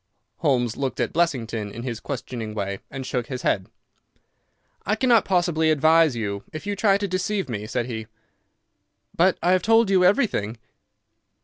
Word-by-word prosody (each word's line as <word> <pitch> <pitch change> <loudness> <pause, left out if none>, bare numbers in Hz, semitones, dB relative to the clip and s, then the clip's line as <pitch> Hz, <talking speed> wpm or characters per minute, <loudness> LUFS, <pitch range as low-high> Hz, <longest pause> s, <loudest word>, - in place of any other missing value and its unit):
Holmes 125 -7 +1
looked 135 -2 -3
at 120 - -1
Blessington 115 -10 -1
in 115 +3 -7
his 120 -3 -4
questioning 115 -5 -5
way 100 -1 -3
and 135 -1 -6
shook 125 -2 -2
his 125 -2 -5
head. 95 -1 0 1.2
"I 210 - 0
cannot 235 -1 +3
possibly 175 -4 +2
advise 155 -1 +4
you 100 -3 -3
if 155 +4 -7
you 205 0 -2
try 195 -1 +3
to 200 0 -2
deceive 190 +2 -1
me," 105 -4 -5
said 120 0 -2
he. 110 -3 -6 1.1
"But 185 +2 +3
I 180 - +3
have 185 0 +3
told 225 +1 +4
you 185 -2 +4
everything." 180 - +2
140 Hz, 165 wpm, -24 LUFS, 115-185 Hz, 1.2 s, advise